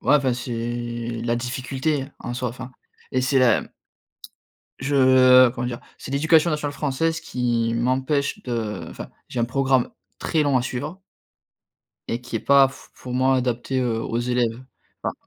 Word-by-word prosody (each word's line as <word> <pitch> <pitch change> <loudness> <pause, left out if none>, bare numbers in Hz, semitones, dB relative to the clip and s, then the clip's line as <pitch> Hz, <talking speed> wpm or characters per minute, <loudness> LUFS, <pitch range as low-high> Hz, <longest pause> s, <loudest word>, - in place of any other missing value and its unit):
ouais - - +4
enfin, 135 -3 +1
c'est 120 -1 -4
la 120 0 +1
difficulté 130 +3 -2
en 120 - -5
soi, 125 0 -2
enfin, 125 +2 -8 0.4
et 130 - +2
c'est 130 +1 +2
la, 125 -3 +4
mmh - - -13 1.1
je 130 -2 +6
comment 120 0 -4
dire? 120 -1 -5 0.2
C'est - - -8
l'éducation 160 +4 +4
nationale 150 -2 -2
française 160 +3 -1
qui 120 -2 -1
m'empêche 130 +4 0
de 115 -5 -3
enfin, - - -8 0.2
j'ai 125 - -3
un - - +3
programme 130 +1 +1 0.3
très 160 -2 +1
long 140 -3 +3
à - - -1
suivre 145 +9 -5 1.1
et 115 - -2
qui 120 -1 -5
est - - -3
pas 140 -1 +5
f 130 0 -14
pour 125 - -8
moi, 130 +1 +3
adapté, 125 +1 -1
heu, 115 -3 0
aux 115 - -2
élèves, 120 -1 0 0.4
enfin. - - -1
130 Hz, 165 wpm, -23 LUFS, 120-135 Hz, 1.1 s, je